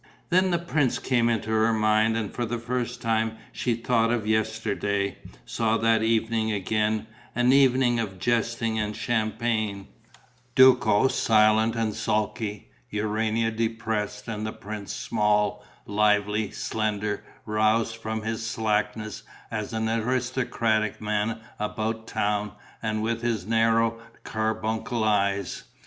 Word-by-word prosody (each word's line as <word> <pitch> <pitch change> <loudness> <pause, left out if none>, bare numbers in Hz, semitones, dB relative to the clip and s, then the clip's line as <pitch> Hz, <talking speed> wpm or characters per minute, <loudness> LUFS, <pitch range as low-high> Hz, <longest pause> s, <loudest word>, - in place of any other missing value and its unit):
Then 185 +2 +4
the 175 - +2
prince 155 -6 0
came 120 -2 +1
into 110 -1 -1
her 110 +1 +3
mind 110 +1 +3
and 110 -3 -3
for 120 - -2
the 120 +1 -2
first 120 +1 -3
time 110 -1 0
she 120 -2 -1
thought 115 -1 +1
of 115 -3 0
yesterday, 110 -2 -1 0.3
saw 115 - 0
that 115 -1 +3
evening 110 0 +1
again, 105 +2 0 0.3
an 120 +1 +4
evening 130 -3 +4
of 100 -4 -3
jesting 115 +1 0
and 105 0 -2
champagne: 110 -2 -1 0.7
Duco 130 -3 +6
silent 110 -1 +3
and 110 -2 0
sulky, 105 0 -2 0.2
Urania 110 +2 0
depressed 110 -2 -2
and 110 -2 -4
the 110 - -2
prince 105 -1 -7
small, 105 -1 0 0.2
lively, 105 0 +2
slender, 105 -1 -2 0.2
roused 110 +1 +1
from 110 -1 -4
his 115 0 -3
slackness 110 -1 -1 0.3
as 110 -2 -3
an 110 0 -1
aristocratic 115 -1 0
man 105 +2 -1 0.2
about 110 +1 -3
town 105 0 -1 0.3
and 110 -1 -1
with 115 +1 -1
his 115 -6 -1
narrow 115 +1 +2 0.2
carbuncle 110 +1 -2
eyes. 100 -3 0
110 Hz, 125 wpm, -26 LUFS, 105-115 Hz, 0.7 s, Duco